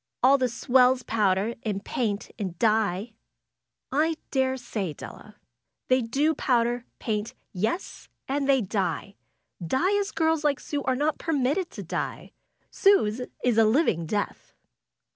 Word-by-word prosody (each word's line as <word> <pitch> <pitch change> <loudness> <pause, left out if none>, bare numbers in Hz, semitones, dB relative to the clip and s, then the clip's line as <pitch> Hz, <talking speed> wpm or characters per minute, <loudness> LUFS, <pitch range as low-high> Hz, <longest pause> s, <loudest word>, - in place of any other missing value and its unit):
^^All 275 +2 +6
the 255 -1 +1
swells 250 +2 +3
powder, 210 0 +1
and 205 -2 -3
paint, 215 -5 -2
and 185 -5 -4
dye." 215 0 +1 1.2
daresay, 260 - -1
Della. - - -11 0.5
They 255 0 +4
do 275 +7 +1
powder, 240 -3 +1
paint 215 -1 -3
— - - -35
^yes, 220 - -3 0.2
and 275 +1 -1
they 270 -2 +5
die! 200 0 -2 0.5
Die 365 - +1
as 400 0 -1
girls 320 -3 +1
like 290 -2 +2
Sue 290 -1 -3
are 260 - +2
not 300 +4 0
permitted 315 +3 0
to - - -8
die. - - -4 0.4
Sue's 250 - +3 0.2
is 240 -3 +3
a - - +7
living 215 - +2
death." 205 +4 -3
245 Hz, 135 wpm, -26 LUFS, 210-275 Hz, 1.2 s, a